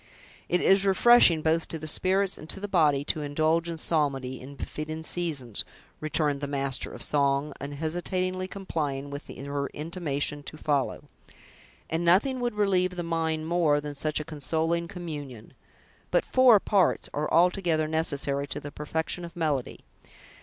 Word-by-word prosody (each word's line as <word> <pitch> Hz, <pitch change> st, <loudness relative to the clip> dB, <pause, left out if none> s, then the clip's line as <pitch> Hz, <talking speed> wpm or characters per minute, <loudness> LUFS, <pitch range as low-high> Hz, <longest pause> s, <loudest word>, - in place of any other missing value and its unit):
"It 180 Hz, -, +2 dB
is 195 Hz, 0 st, +5 dB
refreshing 195 Hz, -4 st, +6 dB
both 160 Hz, +1 st, +1 dB
to 165 Hz, -, -5 dB
the 155 Hz, -, -8 dB
spirits 190 Hz, +4 st, +1 dB
and 155 Hz, -, -11 dB
to -, -, -3 dB
the 205 Hz, -, -4 dB
body 150 Hz, -7 st, +3 dB
to 150 Hz, +1 st, -1 dB
indulge 155 Hz, +3 st, +1 dB
in 165 Hz, -, -4 dB
psalmody, 135 Hz, -5 st, -1 dB
in 140 Hz, +2 st, -10 dB
befitting 155 Hz, +3 st, -5 dB
seasons," 150 Hz, -, -1 dB, 0.4 s
returned 150 Hz, -2 st, 0 dB
the 145 Hz, -, -2 dB
master 140 Hz, -2 st, -1 dB
of -, -, -7 dB
song, 140 Hz, 0 st, +1 dB
unhesitatingly 175 Hz, +6 st, -2 dB
complying 150 Hz, -8 st, -4 dB
with 140 Hz, 0 st, -7 dB
her 140 Hz, +1 st, -4 dB
intimation 150 Hz, -3 st, -2 dB
to 155 Hz, -, -7 dB
follow; 145 Hz, -3 st, -1 dB, 0.8 s
"and 165 Hz, +1 st, -1 dB
nothing 205 Hz, +10 st, +3 dB
would 240 Hz, -3 st, -2 dB
relieve 185 Hz, -3 st, +1 dB
the 175 Hz, -, -3 dB
mind 160 Hz, -1 st, -1 dB
more 160 Hz, -3 st, +2 dB
than 145 Hz, 0 st, -6 dB
such 150 Hz, +2 st, -1 dB
a -, -, -3 dB
consoling 165 Hz, +3 st, -1 dB
communion. 145 Hz, -, -8 dB, 0.6 s
But -, -, +2 dB
four 255 Hz, -5 st, +6 dB
parts 195 Hz, -1 st, +2 dB
are 150 Hz, +1 st, -2 dB
altogether 170 Hz, -2 st, +3 dB
necessary 145 Hz, -3 st, -1 dB
to 145 Hz, -, -4 dB
the 145 Hz, 0 st, -8 dB
perfection 160 Hz, +4 st, -3 dB
of 170 Hz, -1 st, -9 dB
melody. 150 Hz, -6 st, -2 dB
160 Hz, 155 wpm, -27 LUFS, 145-175 Hz, 0.8 s, refreshing